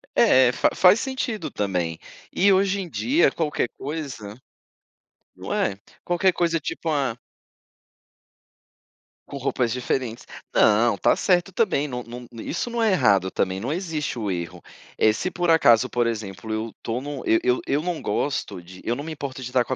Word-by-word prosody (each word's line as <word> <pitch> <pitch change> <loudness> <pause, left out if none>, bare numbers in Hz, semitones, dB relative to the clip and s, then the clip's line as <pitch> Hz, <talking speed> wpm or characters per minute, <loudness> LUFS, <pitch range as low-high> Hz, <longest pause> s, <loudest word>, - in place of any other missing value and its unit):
É, 130 -1 +5
fa - - +2
faz 185 +4 +6
sentido 245 -8 -3
também. 90 -5 -2 0.3
E 200 +1 +4
hoje 195 +1 +2
em 175 - -7
dia 285 - +2
qualquer 150 -6 -1
coisa 135 -9 -6 1.0
não - - -6
é, 100 -1 0 0.3
qualquer 175 +1 +2
coisa, 170 -1 +1
tipo, 160 +2 -4
a 135 -6 0 2.1
Com 140 - -7
roupas 125 -3 -1
diferentes. 125 -1 -2 0.3
Não, 110 0 +4
tá - - +3
certo 180 0 +1
também, 180 -10 +1
não 125 -2 -5
não, 120 +1 -9 0.2
isso 210 - -3
não 235 -1 -2
é 220 -3 +3
errado 100 - +3
também, 95 0 -1
não 125 +7 -3
existe 160 -7 -3
o 105 -4 -2
erro. 85 -2 -5 0.4
Eh, 110 -1 +4
se 185 - -2
por 175 -2 0
acaso, 125 -6 +5
por 120 -2 0
exemplo, 110 -1 -5
eu 110 +1 -3
tô 115 +2 -2
no 140 -1 -6
eu 110 - +4
eu 125 0 +2
eu 145 +2 +1
não 175 -2 -3
gosto 140 -9 -2
de 90 +2 -13
eu 120 - -1
não 140 - -6
me 160 - -6
importo 135 -3 -6
de 125 - -5
estar 125 -1 +2
com 130 - -3
a - - -2
130 Hz, 175 wpm, -24 LUFS, 110-170 Hz, 2.1 s, faz